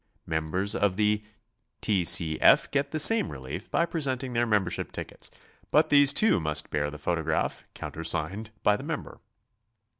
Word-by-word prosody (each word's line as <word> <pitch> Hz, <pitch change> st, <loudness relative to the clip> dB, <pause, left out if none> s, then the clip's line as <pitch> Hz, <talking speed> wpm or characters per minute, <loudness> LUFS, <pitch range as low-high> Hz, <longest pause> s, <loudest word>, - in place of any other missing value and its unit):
Members 80 Hz, +6 st, -1 dB
of 100 Hz, -4 st, 0 dB
the 105 Hz, 0 st, +1 dB, 0.6 s
T. 100 Hz, -4 st, 0 dB
C. 80 Hz, -2 st, +3 dB
F. -, -, +5 dB
get 140 Hz, 0 st, 0 dB
the 155 Hz, -, -3 dB
same 225 Hz, +6 st, +4 dB
relief 70 Hz, -, -8 dB
by 170 Hz, -, +1 dB
presenting 135 Hz, -6 st, -2 dB
their 120 Hz, 0 st, +1 dB
membership 100 Hz, -5 st, -1 dB
tickets, -, -, -8 dB, 0.4 s
but -, -, +3 dB
these 145 Hz, -1 st, +6 dB
too 215 Hz, -, +3 dB
must 75 Hz, -1 st, -2 dB
bear 75 Hz, -1 st, -1 dB
the 75 Hz, -, -9 dB
photograph, 80 Hz, 0 st, -2 dB
countersigned 80 Hz, +6 st, -3 dB
by 105 Hz, -, +4 dB
the 120 Hz, -, -7 dB
mem 160 Hz, 0 st, -4 dB
ber. -, -, -14 dB
105 Hz, 160 wpm, -27 LUFS, -, 0.6 s, these